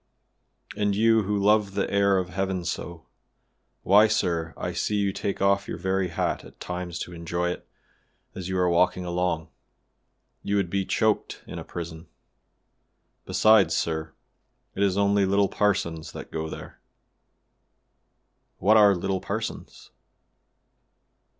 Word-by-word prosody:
"And 105 Hz, -1 st, 0 dB
you, 115 Hz, +1 st, +4 dB
who 105 Hz, +1 st, 0 dB
love 100 Hz, 0 st, +2 dB
the 100 Hz, -, 0 dB
air 100 Hz, -1 st, +3 dB
of 90 Hz, -1 st, -2 dB
heaven 95 Hz, -1 st, -2 dB
so; 85 Hz, 0 st, -5 dB, 0.8 s
why, 105 Hz, +3 st, +6 dB
sir, 85 Hz, -7 st, 0 dB
I -, -, -3 dB
see 105 Hz, -, -1 dB
you 100 Hz, -1 st, +1 dB
take 100 Hz, 0 st, -3 dB
off 100 Hz, 0 st, +2 dB
your -, -, -4 dB
very 95 Hz, +1 st, 0 dB
hat 85 Hz, -, -2 dB
at -, -, -15 dB
times 90 Hz, -1 st, -5 dB
to 90 Hz, -, -6 dB
enjoy 85 Hz, +1 st, -2 dB
it -, -, -8 dB, 0.7 s
as 95 Hz, -1 st, -6 dB
you 95 Hz, -, -1 dB
are 90 Hz, 0 st, +2 dB
walking 90 Hz, +1 st, +2 dB
along; 85 Hz, -2 st, -1 dB, 0.9 s
you 100 Hz, -, -1 dB
would 100 Hz, -4 st, 0 dB
be 100 Hz, -1 st, 0 dB
choked 110 Hz, -1 st, 0 dB
in -, -, -7 dB
a -, -, -6 dB
prison. 85 Hz, -1 st, -7 dB, 1.2 s
Besides, 105 Hz, -7 st, +4 dB
sir, 80 Hz, -1 st, -2 dB, 0.6 s
it 95 Hz, -, -4 dB
is 100 Hz, -1 st, +2 dB
only 100 Hz, 0 st, +3 dB
little 100 Hz, 0 st, +2 dB
parsons 85 Hz, -6 st, -1 dB
that -, -, -9 dB
go 80 Hz, 0 st, -3 dB
there." -, -, -10 dB, 1.8 s
"What 105 Hz, +4 st, +4 dB
are 100 Hz, -2 st, +6 dB
little 95 Hz, +1 st, -2 dB
parsons?" 110 Hz, +3 st, -6 dB
95 Hz, 140 wpm, -26 LUFS, 85-100 Hz, 1.8 s, why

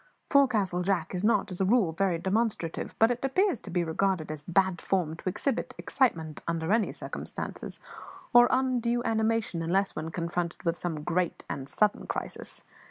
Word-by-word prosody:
Forecastle 215 Hz, -, +3 dB
Jack 180 Hz, -3 st, 0 dB
is 180 Hz, +1 st, -2 dB
not, 210 Hz, -2 st, +2 dB
as 180 Hz, -, -4 dB
a -, -, +3 dB
rule, 205 Hz, -4 st, +3 dB
very 180 Hz, +1 st, +1 dB
demonstrative; 190 Hz, -2 st, -1 dB
it 230 Hz, +2 st, +4 dB
appears 350 Hz, -, +2 dB
to -, -, -9 dB
be 175 Hz, -1 st, +1 dB
regarded 165 Hz, -1 st, 0 dB
as 155 Hz, -1 st, -6 dB
"bad 180 Hz, +2 st, +1 dB
form" 175 Hz, -5 st, 0 dB
to 185 Hz, -, -3 dB
exhibit 255 Hz, +7 st, -2 dB
excitement 160 Hz, -, 0 dB
under 165 Hz, +2 st, 0 dB
any 220 Hz, -2 st, +2 dB
circumstances, -, -, -6 dB, 0.5 s
or 240 Hz, 0 st, +8 dB
undue 245 Hz, -2 st, +1 dB
animation 220 Hz, -6 st, 0 dB
unless 190 Hz, +4 st, +1 dB
when 155 Hz, +1 st, -4 dB
confronted 170 Hz, +1 st, -3 dB
with 170 Hz, -1 st, +1 dB
some 160 Hz, -4 st, -4 dB
great 175 Hz, +1 st, -1 dB
and 135 Hz, 0 st, -5 dB
sudden 210 Hz, +7 st, +1 dB
crisis. -, -, -5 dB
190 Hz, 165 wpm, -28 LUFS, 170-225 Hz, 0.5 s, or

